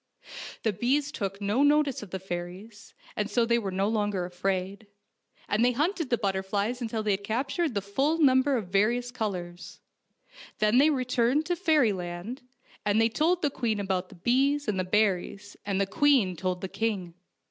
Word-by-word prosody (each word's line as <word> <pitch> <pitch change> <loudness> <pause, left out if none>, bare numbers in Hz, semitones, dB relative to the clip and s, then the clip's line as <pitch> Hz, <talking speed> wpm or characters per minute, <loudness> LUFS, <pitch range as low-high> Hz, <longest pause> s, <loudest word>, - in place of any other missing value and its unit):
The 220 - +1
bees 275 +8 0
took 195 -5 -4
no 205 +6 0
notice 290 -2 +3
of 210 - -9
the 190 - -4
fairies, 190 +4 -8 0.2
and 210 0 -2
so 240 -1 +2
they 235 0 +2
were 200 -4 -3
no 190 +1 0
longer 205 -4 0
afraid, 190 +3 -3 0.6
and 210 +3 +1
they 250 0 +3
hunted 320 +3 -1
the 240 - +2
butterflies 200 +4 -1
until 225 -2 -2
they 210 - +1
had 195 0 -1
captured 270 +6 -1
the 200 - -1
full 270 +11 0
num 260 -4 +5
ber 275 -1 +1
of 205 -6 -5
various 235 +6 +1
colors. 180 -7 -5 0.8
Then 215 +4 +3
they 295 +3 +6
returned 255 +1 +1
to 350 +1 0
fairyland, 225 - 0 0.4
and 210 +1 +2
they 225 0 +4
told 330 +9 +1
the 290 - +2
queen 225 -5 -1
about 190 -2 -2
the - - -13
bees 270 +9 +1
and 200 -3 0
the - - +1
berries, 200 0 0
and 195 -1 0
the 195 - +2
queen 230 -4 +3
told 180 +1 -3
the 190 - -3
king. 195 -5 -3
215 Hz, 180 wpm, -27 LUFS, 195-255 Hz, 0.8 s, they